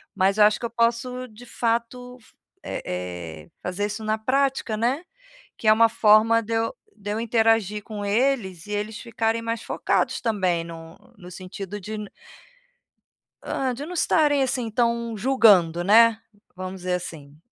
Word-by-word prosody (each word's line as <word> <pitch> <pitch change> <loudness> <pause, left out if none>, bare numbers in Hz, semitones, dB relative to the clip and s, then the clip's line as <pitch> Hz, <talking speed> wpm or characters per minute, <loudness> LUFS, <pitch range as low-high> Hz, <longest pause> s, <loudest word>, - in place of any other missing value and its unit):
Mas 195 +2 +2
eu 210 - +6
acho 210 0 +3
que - - -4
eu - - -2
posso 235 +2 -1
de 220 +3 -14
fato 240 +2 -2
f - - -23 0.3
eh - - -5
eh 90 -3 -6
fazer 180 +3 -2
isso 220 +2 -6
na 215 0 0
prática, 265 -1 0
né, 250 +8 0 0.5
que 220 - -4
é 215 - +8
uma 230 +1 +5
forma 225 +1 +4
de 230 - -5
eu, 225 0 -1 0.2
de 205 -1 -6
eu 215 - -2
interagir 225 -3 +1
com 210 -1 -7
eles 205 -6 0
e - - -8
eles 210 +1 -3
ficarem 230 -1 -1
mais 230 0 -3
focados - - -1
também 185 -7 0
no 165 -1 -10 0.2
no 180 -2 -12
sentido 195 +2 -7
de 215 +3 -6 1.5
hã, 260 -2 -1
de 280 +4 -6
não 360 - -7
estarem 295 -4 +2
assim 255 -3 -1
tão 235 -1 0
julgando, 195 -9 +4
né, 225 +3 +6 0.4
vamos 185 0 -7
dizer 180 0 -2
assim. 150 -5 -6
220 Hz, 165 wpm, -24 LUFS, 190-235 Hz, 1.5 s, é